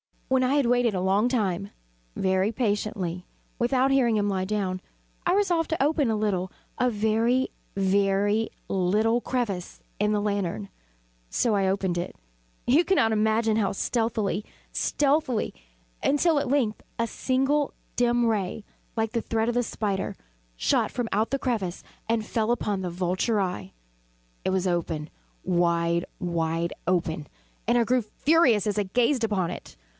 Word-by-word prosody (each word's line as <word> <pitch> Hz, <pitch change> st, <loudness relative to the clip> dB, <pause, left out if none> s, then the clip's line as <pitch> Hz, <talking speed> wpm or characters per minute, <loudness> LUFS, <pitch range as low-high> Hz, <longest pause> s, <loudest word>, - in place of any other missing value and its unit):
When 260 Hz, 0 st, +3 dB
I 260 Hz, +3 st, +2 dB
had 285 Hz, -3 st, +3 dB
waited 240 Hz, -3 st, +2 dB
a 180 Hz, -, 0 dB
long 195 Hz, +5 st, +3 dB
time, 200 Hz, -6 st, -1 dB, 0.4 s
very 190 Hz, +2 st, +1 dB
patiently, 205 Hz, -6 st, -1 dB, 0.3 s
without 255 Hz, +2 st, +2 dB
hearing 250 Hz, -4 st, +3 dB
him 205 Hz, -1 st, +1 dB
lie 190 Hz, -1 st, 0 dB
down, 190 Hz, -2 st, -1 dB, 0.5 s
I 350 Hz, -, +4 dB
resolved 360 Hz, -5 st, +2 dB
to 320 Hz, -, +1 dB
open 295 Hz, -3 st, +2 dB
a 220 Hz, -, +1 dB
little 195 Hz, -3 st, -1 dB, 0.3 s
a 250 Hz, -, +3 dB
very, 225 Hz, +4 st, +1 dB, 0.3 s
very 200 Hz, +2 st, +2 dB, 0.2 s
little 210 Hz, +5 st, +2 dB
crevice 230 Hz, -8 st, -3 dB, 0.2 s
in 210 Hz, +1 st, +2 dB
the 210 Hz, -, +1 dB
lantern. 195 Hz, -, -2 dB, 0.6 s
So 230 Hz, -, +1 dB
I 195 Hz, -2 st, +2 dB
opened 190 Hz, -2 st, 0 dB
it 175 Hz, -, -5 dB, 0.5 s
you 295 Hz, +8 st, +4 dB
cannot 285 Hz, -13 st, +3 dB
imagine 220 Hz, +1 st, +2 dB
how 200 Hz, -3 st, +1 dB
stealthily, 220 Hz, -2 st, 0 dB, 0.3 s
stealthily 280 Hz, -5 st, +1 dB, 0.5 s
until, 295 Hz, +2 st, +3 dB
at 280 Hz, -, -2 dB
length 245 Hz, -6 st, +1 dB, 0.2 s
a 230 Hz, -, +1 dB
simple 270 Hz, +5 st, +1 dB, 0.2 s
dim 240 Hz, 0 st, +3 dB
ray, 210 Hz, -2 st, -1 dB, 0.3 s
like 225 Hz, -1 st, 0 dB
the 230 Hz, -, 0 dB
thread 225 Hz, +1 st, 0 dB
of 240 Hz, -, -1 dB
the 245 Hz, -, +2 dB
spider, 205 Hz, -4 st, -2 dB, 0.4 s
shot -, -, +1 dB
from 240 Hz, -2 st, -2 dB
out 215 Hz, +3 st, +1 dB
the 275 Hz, -, -1 dB
crevice 210 Hz, -10 st, -2 dB, 0.3 s
and 225 Hz, -1 st, +1 dB
fell 220 Hz, 0 st, 0 dB
full 240 Hz, -, +3 dB
upon 205 Hz, -5 st, -1 dB
the 180 Hz, -, -2 dB
vulture 185 Hz, +5 st, 0 dB
eye. 105 Hz, -, -3 dB, 0.7 s
It -, -, +2 dB
was 190 Hz, 0 st, 0 dB
open 165 Hz, -4 st, -1 dB, 0.3 s
wide, 170 Hz, -1 st, +1 dB
wide 170 Hz, -1 st, -1 dB
open 165 Hz, -4 st, 0 dB, 0.4 s
and 240 Hz, +1 st, +4 dB
I 235 Hz, -, +4 dB
grew 250 Hz, +2 st, +2 dB
furious 245 Hz, -, +3 dB
as 210 Hz, -1 st, 0 dB
I -, -, +2 dB
gazed 240 Hz, +5 st, +2 dB
upon 190 Hz, -6 st, 0 dB
it. -, -, -9 dB
215 Hz, 155 wpm, -26 LUFS, 190-245 Hz, 0.7 s, I